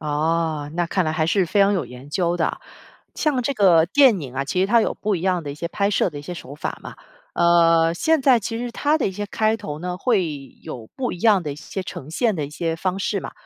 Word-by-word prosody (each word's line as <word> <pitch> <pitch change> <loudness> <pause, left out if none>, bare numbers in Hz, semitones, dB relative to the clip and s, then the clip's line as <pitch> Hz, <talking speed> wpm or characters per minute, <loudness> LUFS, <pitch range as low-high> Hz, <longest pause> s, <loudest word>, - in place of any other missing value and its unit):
哦， 155 0 -1
那 175 0 0
看 185 +2 0
来 155 - -1
还 155 0 0
是 185 +2 +2
非 200 +4 +1
常 200 +1 +5
有 190 - -1
研 125 +3 -12
究 175 +2 0
的。 165 - -1 0.6
像 290 -5 0
这 280 +3 -1
个 175 -7 +5
电 245 -1 +5
影 130 -4 -8
啊， 135 +1 -1
其 180 +6 -1
实 190 - +3
它 230 +3 +4
有 - - 0
不 205 -1 -1
一 - - -5
样 185 -2 +1
的 145 - -5
一 - - -6
些 170 +3 -5
拍 200 +3 0
摄 195 - +1
的 145 - -8
一 - - -9
些 175 +5 -6
手 145 -4 -9
法 150 - -5
嘛。 - - -9 0.4
呃， 165 -1 +4
现 320 - +2
在 255 -3 +5
其 225 +2 -4
实 245 0 -4
它 295 +6 +1
的 280 - 0
一 190 - -2
些 205 +2 -4
开 220 +2 +1
头 155 -9 -6
呢， 180 +2 -4
会 200 -2 +1 0.4
有 115 -3 -8
不 255 -2 -2
一 - - -7
样 210 -4 +4
的 150 -3 -4
一 - - -10
些 190 +5 -6
呈 150 -5 -8
现 220 +6 +1
的 155 -5 -2
一 - - -12
些 165 +1 -2
方 185 +2 -2
式 200 0 -1
嘛。 - - -7
180 Hz, 285 characters per minute, -22 LUFS, 160-205 Hz, 0.6 s, 常